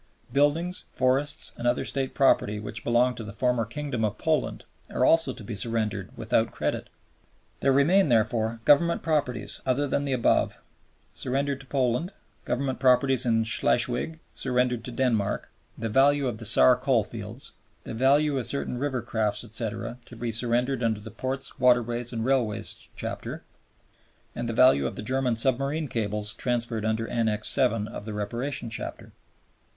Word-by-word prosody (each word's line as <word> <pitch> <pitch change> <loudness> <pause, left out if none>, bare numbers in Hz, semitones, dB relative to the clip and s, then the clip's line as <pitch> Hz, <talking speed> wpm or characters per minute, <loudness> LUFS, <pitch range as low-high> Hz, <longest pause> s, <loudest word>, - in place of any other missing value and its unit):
Buildings, 155 +6 +1
forests, 135 +3 0
and 120 - -2
other 120 - +1
State 135 -1 -3
property 105 -6 +3
which 105 - -6
belonged 120 +1 +2
to 115 - -5
the 105 - -7
former 125 -2 0
Kingdom 125 -1 -4
of 105 -1 -1
Poland - - -1 0.3
are 130 - +2
also 165 -3 +4
to 120 - -9
be 105 +1 -6
surrendered 105 -3 -1
without 115 0 +1
credit. - - -3 0.7
There 135 - +3
remain, 155 +6 +4
therefore, 115 0 +1
Government 170 +4 +4
properties, 145 -8 -1
other 135 +3 +1
than 140 - 0
the 135 - -1
above, 125 - +1 0.5
surrendered 140 +1 -1
to 135 - -13
Poland, 130 +7 0 0.3
Government 130 +1 -2
properties 130 0 +3
in 115 -1 +3
Schleswig 120 +6 +1
surrendered 125 -2 0
to 125 - -6
Denmark, 115 -5 0 0.3
the 115 - -3
value 135 +4 +3
of 115 -3 -3
the 115 - -5
Saar 125 +2 +6
coalfields, 120 0 -2 0.3
the - - -7
value 140 +4 +3
of 120 - -2
certain 135 -3 -2
river 130 -4 -2
craft, 110 -3 -1
etc., 115 +1 -5
to 120 - -12
be 120 0 -3
surrendered 120 +3 +1
under 110 -3 0
the 110 +1 -10
Ports, 130 +4 -5
Waterways, 120 -1 +2
and 115 -2 -3
Railways 125 -6 -1
Chapter, - - -5 0.9
and 120 0 -4
the - - -2
value 110 - +5
of - - -6
the - - -6
German 130 0 0
submarine 135 +6 0
cables 105 -3 -2
transferred 120 -2 -1
under 110 +1 -1
Annex 110 -2 +1
VII. 120 -6 +2
of 105 - -8
the 110 -1 -5
Reparation 120 +4 -3
Chapter. - - -5
125 Hz, 160 wpm, -26 LUFS, 115-135 Hz, 0.9 s, Saar